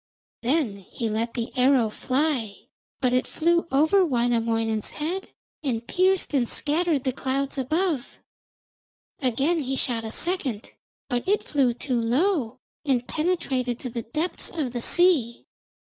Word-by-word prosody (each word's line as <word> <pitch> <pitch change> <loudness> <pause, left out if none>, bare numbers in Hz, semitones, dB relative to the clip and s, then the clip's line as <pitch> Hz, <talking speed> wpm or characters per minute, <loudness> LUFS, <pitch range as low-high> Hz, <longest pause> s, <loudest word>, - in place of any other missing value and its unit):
Then 250 -5 +1
he 220 +4 -5
let 230 +2 -2
the 235 +1 -4
arrow 250 -3 +4
fly, 255 -5 0 0.5
but 250 -2 +2
it 255 - +1
flew 340 +1 +1
over 315 +8 +4
Wainamoinen's 230 - 0
head 345 +6 -3 0.3
and 240 -6 -2
pierced 375 -2 +2
and 250 -4 +2
scattered 305 -1 +1
the 260 - 0
clouds 275 +1 -2
above. 310 0 -1 1.0
Again 275 +6 +1
he 270 -2 -2
shot 235 -3 0
a 220 - -5
second, 275 - -1 0.3
but 245 +2 -2
it 410 +2 +2
flew 265 -5 +1
too 245 -1 -1
low 255 - +1 0.3
and 255 -4 0
penetrated 275 -8 -1
to 250 - -5
the 235 - -3
depths 310 +10 -3
of 290 -8 -3
the 240 - -3
sea. 290 -8 +3
260 Hz, 140 wpm, -25 LUFS, 235-315 Hz, 1.0 s, arrow